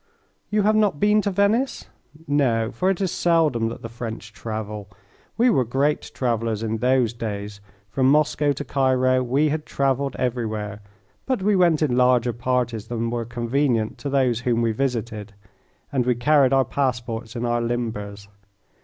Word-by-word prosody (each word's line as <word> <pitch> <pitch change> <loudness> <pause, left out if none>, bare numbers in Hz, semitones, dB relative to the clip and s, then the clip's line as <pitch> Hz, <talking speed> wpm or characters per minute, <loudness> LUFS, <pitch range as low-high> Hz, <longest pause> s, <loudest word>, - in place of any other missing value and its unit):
You 210 -1 +1
have 215 +1 +3
not 205 -8 +2
been 210 +1 +4
to 205 - -1
Venice? 205 +7 +1 0.4
No, 120 -6 +1
for 185 - 0
it 195 - 0
is 190 -3 0
seldom 155 -10 +2
that 115 - -9
the - - -4
French 115 -1 -7
travel. 105 -3 -6 0.5
We 240 +2 +4
were 130 - +3
great 135 +5 0
travellers 115 -3 -1
in 110 0 -1
those 125 -1 +2
days. 105 -3 -5 0.3
From 130 +6 +1
Moscow 150 0 +2
to 145 +1 -6
Cairo 130 -1 +2
we 135 +5 +1
had 155 +1 -2
travelled 140 0 0
everywhere, 110 -4 -3 0.5
but 255 -7 -1
we 210 +1 +3
went 170 -4 +3
in 130 -5 +1
larger 125 -1 +3
parties 120 -3 -1
than 115 -1 -2
were 120 -1 -2
convenient 120 -1 -1
to 140 - -4
those 130 -4 +2
whom 120 -1 0
we 115 - +2
visited, 110 -4 -3 0.6
and 135 -3 +1
we 125 - +3
carried 135 +2 +3
our 135 -1 +3
passports 120 -3 -2
in 120 0 -2
our 120 0 0
limbers. 110 -4 -4
125 Hz, 165 wpm, -23 LUFS, 115-145 Hz, 0.6 s, been